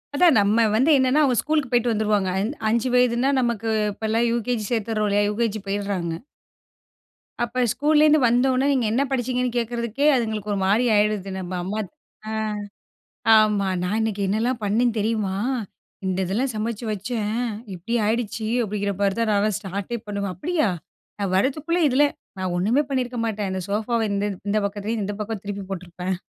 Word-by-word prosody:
அதான் 335 -3 +5
நம்ப 205 +3 +3 0.2
வந்து 265 +8 +4
என்னன்னா 260 +3 +3
அவங்க 255 -4 +2
ஸ்கூலுக்கு 300 -4 0
போய்ட்டு 240 -1 +2
வந்துருவாங்க. 210 -3 +1
அஞ் 210 +5 -1 0.2
5 235 +3 +1
வயதுனா 250 +2 +3
நமக்கு 230 -2 -1 0.2
இப்போலாம் 225 +3 0
யுகேஜி 235 -1 -1
சேர்த்துட்றோம் 220 -2 0
இல்லயா, 205 +1 +2
யுகேஜி 215 0 -1
போயிட்றாங்க. 195 -4 -2 1.3
அப்ப 240 +2 -1
ஸ்கூல்லேருந்து 305 +1 +4
வந்த 245 +2 +3
உடனே. 255 +2 +1
நீங்க 255 -4 +1
என்ன 265 +4 +2
படிச்சிங்கன்னு 250 -1 -1
கேட்கறதுக்கே 235 +3 -1
அதுங்களுக்கு 220 -4 -2
ஒரு 200 - -1
மாரி 215 +6 +3
ஆயிடுது. 205 -2 +1
நம்ப 185 0 -6
அம்மா 200 +4 -3 0.5
ஆ. - - -4 1.1
ஆமா. 210 -2 +3 0.2
"நான் 180 +4 -1
இன்னைக்கு 215 -2 -1
என்னலாம் 230 +5 0
பண்ணேன் 225 +3 +2
தெரியுமா? 210 -2 0 0.7
இந்த 185 -1 -1
இதெல்லாம் 235 +9 -1
சமைச்சு 220 +2 -3
வச்சேன். 210 +1 -3 0.4
இப்டி 185 +7 -4
ஆய்டுச்சு." 220 0 -1 0.2
அப்டிங்கிற 205 -1 -2
மாரி 195 -1 +1
தான் 230 -1 +1
நான் 205 -1 +2
ஸ்டார்ட்டே 200 +4 -4
பண்ணுவேன். 200 -2 -3
அப்டியா 310 - 0 0.5
நான் 195 -2 -1
வரதுக்குள்ள 305 - 0
இதுல 275 +2 +4 0.3
நான் 185 -1 -2
ஒண்ணுமே 225 +11 +2
பண்ணியிருக்க 250 -2 -1
மாட்டேன். 210 -3 -2
இந்த 190 0 -3
சோஃபாவ 220 +3 0
இந்த 200 0 0 0.2
இந்த 215 - +2
பக்கத்துல 205 +3 -3
இந்த 205 +1 -3
பக்கம் 210 -1 -4
திருப்பி 200 -1 -5
போட்ருப்பேன். 180 0 -4
220 Hz, 155 wpm, -23 LUFS, 200-245 Hz, 1.3 s, அதான்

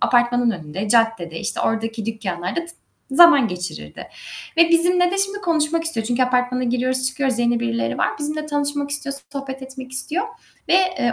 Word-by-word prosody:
apartmanın 245 -1 +2
önünde, 180 +2 -5
caddede, 225 -8 +1
işte, - - -2
oradaki 225 -1 -2
dükkanlarda 190 - -3
t 335 - -8 0.4
zaman 285 -4 +7
geçirirdi 175 - -7 0.5
ve 335 0 +6
bizimle 355 +1 +3
de 390 - -2
şimdi 395 +1 +1
konuşmak 330 -3 0
istiyor. 230 -10 -2
Çünkü 245 +2 +1
apartmana 250 0 0
giriyoruz, 255 +2 0
çıkıyoruz, 260 -2 -1
yeni 235 0 +1
birileri 115 0 -2
var. - - +2
Bizimle 305 +1 -3
tanışmak 290 -1 -2
istiyor, 285 -1 0 0.2
sohbet 270 -1 -6
etmek 260 -1 -9
istiyor 315 +9 -1 0.4
ve, - - +4
eee, 365 -10 +2
255 Hz, 160 wpm, -21 LUFS, 225-305 Hz, 0.5 s, zaman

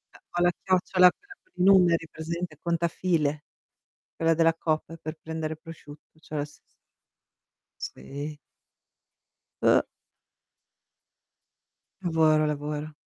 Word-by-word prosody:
E - - -12 0.2
ho 175 - 0
la 175 0 +5
chiocciola, 185 -1 +5
quella 405 -1 -16
con 370 - -35
i 180 - 0
numeri, 175 -4 +5
presente, 165 0 -5
contafile, 170 -3 0 0.7
quella 165 0 +3
della 165 0 +4
coop 165 0 -2
per 155 +1 -6
prendere 160 -1 -4
prosciutto, 155 -1 -13
cioè 155 - -11
la 145 - 0
stess 150 - -18 1.0
Sì. 145 +2 -6 1.3
Oh! - - +6 2.2
Lavora, 160 -3 +3
lavora. 150 +1 -3
160 Hz, 105 wpm, -27 LUFS, 155-175 Hz, 2.2 s, Oh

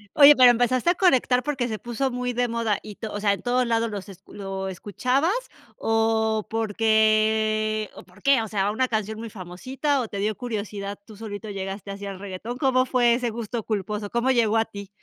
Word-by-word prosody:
Oye, 290 0 +9
pero, 255 -1 +8
¿empezaste 245 +5 +2
a 350 - +3
conectar 260 -8 +3
porque 270 -5 -1
se 220 - -3
puso 240 +4 -2
muy 250 0 -3
de 245 +1 +1
moda 230 -3 -1
y 210 -2 -10
to 220 -2 -6
o 205 - -3
sea, 200 -1 +2
en - - -6
todos 250 0 +1
lados 230 -1 +1
los 200 0 -6
escu 190 - -14
lo 195 -1 -5
escuchabas? 250 - 0 0.5
¿O 220 -1 +1
porque 215 0 +2
o - - -10
por 185 +3 -21
qué, 275 -3 +4
o 220 - -4
sea, 200 0 0
una 255 +4 +1
canción 220 -1 -2
muy 230 - -6
famosita 255 - -2
o 230 - -3
te 200 - -7
dio 210 +1 -1
curiosidad, 205 -4 -5
tú 215 - -13
solito 210 0 -7
llegaste 195 +1 -5
así 200 0 -7
al 195 -1 -7
reguetón? 200 +5 -6
¿Cómo 260 -2 +2
fue 240 -2 +3
ese 240 0 0
gusto 230 +1 -4
culposo, 210 0 -3
cómo 235 +3 +1
llegó 225 -3 +3
a 225 - +2
ti? 200 -3 -9
220 Hz, 210 wpm, -24 LUFS, 205-245 Hz, 0.5 s, Oye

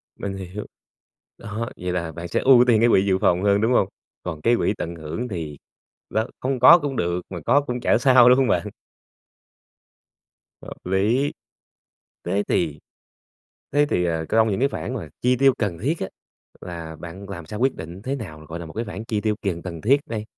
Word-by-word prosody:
Mình 95 -1 -5
hiểu, 95 +2 -7 0.7
đó, 110 +3 -4
vậy 90 0 -3
là 85 -2 -2
bạn 85 +1 -7
sẽ - - 0
ưu 130 -2 +8
tiên 115 -3 +5
cái 120 - +5
quỹ 95 -3 +4
dự 95 -2 +2
phòng 90 +1 +2
hơn, 100 0 +3
đúng 115 +3 +2
hông? 100 - +3 0.4
Còn 80 -4 -5
cái 120 +7 +3
quỹ 110 - +1
tận 85 +1 -4
hưởng 80 +9 -5
thì, 80 -8 -5 0.5
đó, 110 +1 0
không 130 0 -1
có 165 +8 +9
cũng 145 -3 -3
được 85 -3 -1
mà 90 - -6
có 145 - +4
cũng 125 -3 -4
chả - - +3
sao, 125 -1 +6
đúng 125 - +6
hông 135 -1 +3
bạn? - - +1 1.9
Hợp - - -11
lý, 105 +10 +1 0.9
thế 95 +4 0
thì 75 -4 0 0.9
thế 145 +1 +4
thì, 90 -10 0
ờ, 80 -2 -1
cong 110 0 +3
những 100 - -1
cái 135 - +3
khoản 130 - -5
mà 105 -11 -5
chi 125 +1 +2
tiêu 135 +1 +5
cần 100 -7 -2
thiết 140 - 0
á, 95 - -2 0.5
là 85 -2 -7
bạn 90 +4 -9
làm 85 -5 -7
sao 105 +4 -6
quyết 130 +1 +2
định 85 +4 -8
thế 130 +4 -2
nào, 80 - -9
gọi 80 - -6
là, 85 - -7
một 80 - -10
cái 115 +5 -3
khoản 110 0 -7
chi 110 -2 -2
tiêu 110 0 0
kiền 90 -4 -2
cần 85 -3 -6
thiết 135 - +4
đây? 110 -7 -4
100 Hz, 210 wpm, -23 LUFS, 85-125 Hz, 1.9 s, có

